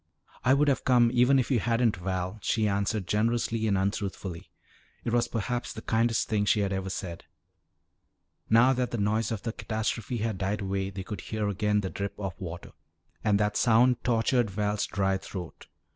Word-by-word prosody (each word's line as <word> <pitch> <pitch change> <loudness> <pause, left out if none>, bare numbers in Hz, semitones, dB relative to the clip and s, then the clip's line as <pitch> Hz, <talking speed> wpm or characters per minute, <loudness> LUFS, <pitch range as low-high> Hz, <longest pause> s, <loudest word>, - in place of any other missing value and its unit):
"I 130 +2 +5
would 145 +1 +3
have 140 - +2
come 120 -2 +4
even 125 +2 +5
if 130 +1 0
you 125 - +3
hadn't, 115 -1 +1
Val," 95 +3 -3
she 110 +1 +1
answered 100 0 0
generously 115 +2 0
and 100 -2 +2
untruthfully. 95 -3 -3 0.5
It 115 - -2
was 120 0 +2
perhaps 120 +2 -3
the - - -8
kindest 115 +1 +1
thing 105 -1 +1
she 105 +1 +3
had 100 -1 0
ever 95 0 -3
said. 85 -3 -6 1.2
Now 120 +4 +6
that 125 -1 -1
the 120 - -3
noise 110 +2 0
of 110 -3 -4
the 115 - -3
catastrophe 110 +2 -3
had 110 -3 -2
died 100 +2 -1
away 95 0 -2
they 95 -1 -6
could 95 -1 -6
hear 110 -1 -3
again 105 +1 +1
the 95 - -4
drip 100 0 -4
of 95 -3 -4
water. 85 -1 -7 0.5
And 100 -1 +3
that 105 0 +1
sound 120 +1 +4
tortured 120 0 +2
Val's 105 +1 -1
dry 95 -1 0
throat. 90 -3 -8
105 Hz, 185 wpm, -28 LUFS, 100-115 Hz, 1.2 s, Now